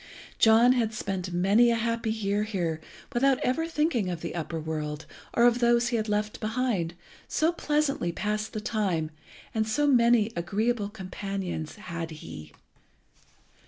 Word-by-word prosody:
John 230 +3 +6
had 225 -3 0
spent 190 -3 -3
many 200 +7 +4
a 235 - +3
happy 230 0 -1
year 205 -2 0
here 175 -7 -2 0.3
without 265 +2 +3
ever 320 +6 0
thinking 300 - 0
of 175 -3 -4
the 170 - -4
upper 165 -1 -3
world, 155 -1 -4 0.3
or 235 - +5
of 240 0 +4
those 235 0 +3
he 240 - -1
had 220 -1 -1
left 210 0 -1
behind, 215 -7 -1 0.3
so 320 +2 +2
pleasantly 295 - 0
passed 210 +5 -2
the 215 - -3
time 190 -8 -1 0.5
so 220 +7 0
many 235 -5 +4
agreeable 205 +5 0
companions 195 -4 -5
had 170 -6 -5
he. 150 - -9
215 Hz, 145 wpm, -27 LUFS, 175-235 Hz, 0.5 s, John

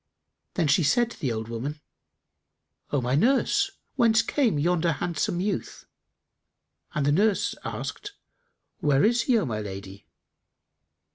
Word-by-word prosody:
Then 170 - +1
she 145 +4 +4
said 230 +11 +2
to - - -12
the 130 - -1
old 110 -1 -4
woman, 130 +6 -5 1.1
"O 145 - 0
my 125 +1 -1
nurse, 275 - +3 0.3
whence 225 -3 +4
came 245 - +1
yonder 170 +2 +1
handsome 170 +3 -2
youth?"; 195 +1 -3 1.1
and 150 - 0
the 145 - +3
nurse 200 +6 +2
asked, 415 -1 -5 0.7
"Where 145 -1 +3
is 235 +2 +3
he, 245 - +5
O 210 - +1
my 110 -5 -3
lady?" 100 0 -8
160 Hz, 135 wpm, -26 LUFS, 135-220 Hz, 1.1 s, he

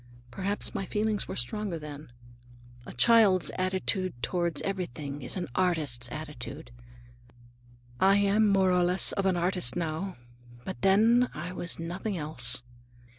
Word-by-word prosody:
Perhaps 195 +9 -3
my 200 - -3
feelings 210 +1 -1
were - - -5
stronger 185 - -3
then. 150 -2 -10 0.8
A - - -7
child's 200 - +4
attitude 185 0 -1
toward 170 +3 -1
everything 150 -7 -5
is 125 - +3
an 175 -2 -3
artist's 150 -10 +2
attitude. 150 -2 -8 1.3
I 195 +1 +5
am 205 +2 +3
more 195 -2 +3
or 180 0 +3
less 180 +1 +4
of 195 -1 -1
an 185 -2 +1
artist 175 -7 +1
now, 170 +3 -3 0.5
but 120 - -6
then 225 +6 +4
I 170 +4 -5
was 175 -1 -4
nothing 180 +4 -4
else. 125 -6 0
180 Hz, 135 wpm, -28 LUFS, 150-195 Hz, 1.3 s, I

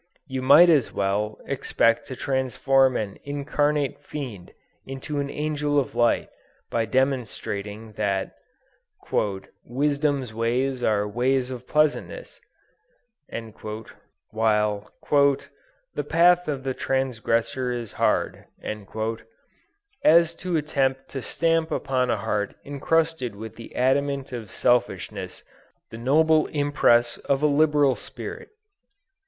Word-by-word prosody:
You 130 -3 -4
might 145 +7 +8
almost 150 -8 +4
as - - -17
well 105 +2 -1
expect 115 0 +1
to 130 - -6
transform 130 0 +2
an 100 -2 -4
incarnate 145 0 -1
fiend 120 -12 -7 0.3
into 135 +2 -5
an 140 0 -2
angel 150 0 -1
of 135 - -3
light, 120 -1 +2 0.4
by 115 -1 +1
demonstrating 110 -4 -2
that 100 -2 -1 1.3
"Wisdom's 140 -1 0
ways 125 +3 0
are 105 -3 +1
ways 125 +4 0
of 125 -1 -8
pleasantness," 155 - 0 1.9
while 105 -1 +1 0.2
"the - - 0
path 175 +1 +4
of 140 -3 -3
the 135 -1 -1
transgressor 125 -1 -1
is 120 -3 -4
hard," - - 0 1.6
as 170 +1 +6
to 175 0 -2
attempt 135 -3 -1
to 135 - -5
stamp 165 +3 +1
upon 130 -2 0
a 115 - +1
heart 105 0 -2
encrusted 145 -3 0
with 110 +2 -8
the 115 - -11
adamant 135 +1 +1
of 115 -5 -6
selfishness, 120 -4 -1 0.5
the 115 - -7
noble 155 +5 +3
impress 145 -5 +2
of 140 +1 -1
a - - +5
liberal 145 -2 +4
spirit. - - -8
135 Hz, 110 wpm, -25 LUFS, 115-145 Hz, 1.9 s, might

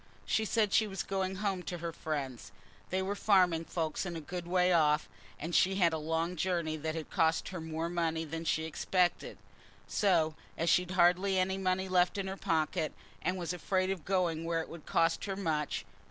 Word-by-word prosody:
She 220 - +1
said 215 -2 +1
she 220 - +4
was 195 -1 -4
going 190 -1 -2
home 190 -1 -1
to 175 0 -5
her 170 0 -4
friends: 145 -6 -4 0.4
they 190 +1 0
were 195 +2 -1
farming 180 -5 +3
folks 160 -2 -2
a 175 -3 -4
good 175 +3 -6
way 180 0 +3
off, 150 -4 +3 0.3
and 165 +3 -5
she'd 190 +3 +4
had 175 -4 +3
a 160 - -1
long 165 +3 -1
journey 170 -2 0
that 155 +1 -3
had 160 -2 -6
cost 160 0 +2
her 185 -3 -5
more 160 +1 -3
money 165 -2 -1
than 165 +2 -5
she 160 -1 0
expected, 175 +3 0 0.5
so 170 -6 +2 0.2
as 165 0 +2
she'd 180 0 +3
hardly 185 +2 +4
any 190 +1 +1
money 190 0 0
left 180 0 +2
in 195 - -1
her 190 0 -4
pocket, 160 -3 0 0.3
and 185 - -1
was 175 -1 -3
afraid 185 +2 0
of 185 -5 -4
going 175 -3 0
where 165 0 0
it - - -8
would 165 -2 -10
cost 165 0 +2
her 195 -2 -3
much. 155 - -1
175 Hz, 200 wpm, -32 LUFS, 160-190 Hz, 0.5 s, she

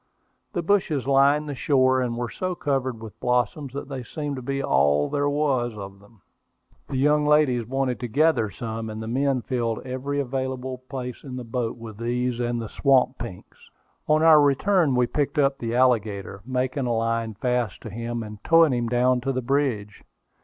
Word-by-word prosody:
The 175 - -2
bushes 165 - +1
lined 140 +2 +3
the 145 - -3
shore, 130 -1 +2
and 120 -2 -2
were 120 -1 -3
so 185 -1 -3
covered 130 -7 -2
with 110 - -10
blossoms 125 +3 0
that 140 -1 -5
they 135 -2 -5
seemed 145 +3 -5
to - - -5
be 135 +2 -3
all 70 - +3
there 145 0 +1
was 135 -6 0
of 100 -1 -8
them. 100 0 -22 0.7
The 135 - -2
young 150 +2 +3
ladies 135 -7 +3
wanted 135 -1 -1
to 125 - -4
gather 130 -3 +2
some, 110 +1 -5
and 110 0 -6
the 110 - -6
men 130 +1 0
filled 120 -3 -2
every 130 +3 -3
available 130 -1 -3
place 125 -2 -6
in 130 -3 -7
the 125 - -5
boat 120 0 -3
with 115 -3 -9
these 120 +1 -1
and 120 -1 -1
the 115 - -4
swamp 130 +1 +2
pinks. 115 -6 -10 0.4
On 155 +1 +3
our 160 -2 +8
return 145 +1 +3
we 125 0 +3
picked 145 +4 -2
up 140 -1 +2
the 115 0 -3
alligator, 105 -6 +1
making 130 +1 -1
a 120 - +1
line 115 -1 -1
fast 125 -2 -1
to 110 - -8
him, 115 +2 -4
and 105 -1 -10
towing 165 -4 +5
him 120 -1 -1
down 125 +1 +2
to 135 +2 -1
the 130 -1 -2
bridge. 120 -6 -1
125 Hz, 190 wpm, -24 LUFS, 115-140 Hz, 0.7 s, our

